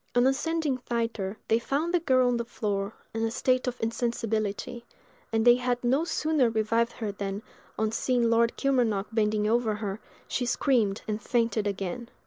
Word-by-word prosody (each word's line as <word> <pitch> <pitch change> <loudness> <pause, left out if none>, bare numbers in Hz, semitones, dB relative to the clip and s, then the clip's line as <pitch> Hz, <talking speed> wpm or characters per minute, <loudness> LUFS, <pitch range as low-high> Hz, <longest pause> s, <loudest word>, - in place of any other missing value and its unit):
On 245 0 +5
ascending 295 +1 +1
thither, 230 -5 -2
they 225 - +3
found 295 +8 -1
the 355 - +4
girl 260 -6 +3
on 245 -1 +2
the 235 - -1
floor, 205 -3 -3 0.2
in 225 - -2
a 225 - +1
state 255 +2 +1
of 250 0 -3
insensibility; 225 -1 -2 0.5
and 225 0 +1
they 240 0 +7
had 245 0 -1
no 265 +7 +2
sooner 305 -7 +2
revived 230 +1 +1
her 215 -3 -3
than, 200 +1 -4 0.3
on 220 0 0
seeing 240 +1 +1
Lord 230 0 +2
Kilmarnock 240 -7 +1
bending 210 -1 +1
over 225 -1 +2
her, 205 -1 -4 0.3
she 245 - -1
screamed 230 -6 +1
and 215 0 -2
fainted 230 -4 0
again. 200 +4 -4
230 Hz, 170 wpm, -28 LUFS, 215-250 Hz, 0.5 s, they